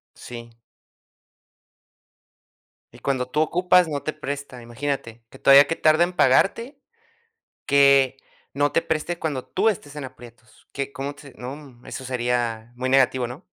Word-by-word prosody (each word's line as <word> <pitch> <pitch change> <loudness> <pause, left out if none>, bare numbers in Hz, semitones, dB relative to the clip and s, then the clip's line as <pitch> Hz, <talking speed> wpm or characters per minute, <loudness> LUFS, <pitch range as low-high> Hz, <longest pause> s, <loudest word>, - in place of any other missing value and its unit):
Sí. 120 -1 -10 2.4
Y - - -15
cuando 130 -2 -1
tú 150 - -1
ocupas 180 +1 +3
no 145 -2 -3
te 155 - -2
presta, 140 -4 -7
imagínate, 120 -2 -5
que 135 - -16
todavía 140 +1 +7
que 165 - -1
tarda 155 +2 +4
en 180 - -4
pagarte, 230 +9 +2 0.9
que 140 -2 +5 0.4
no 145 +1 0
te 165 - +2
preste 165 +1 -3
cuando 145 -5 -3
tú 210 +4 +1
estés 150 -8 -3
en 150 - -6
aprietos, 120 -3 -14
que, 140 0 -4
¿cómo 140 +1 -5
te 145 - -16
se - - -27
no, 130 -1 -9
eso 130 - -7
sería 120 -2 -2
muy 130 +1 -3
negativo, 130 -2 +2
¿no? 140 +9 -10
140 Hz, 150 wpm, -23 LUFS, 125-155 Hz, 2.4 s, todavía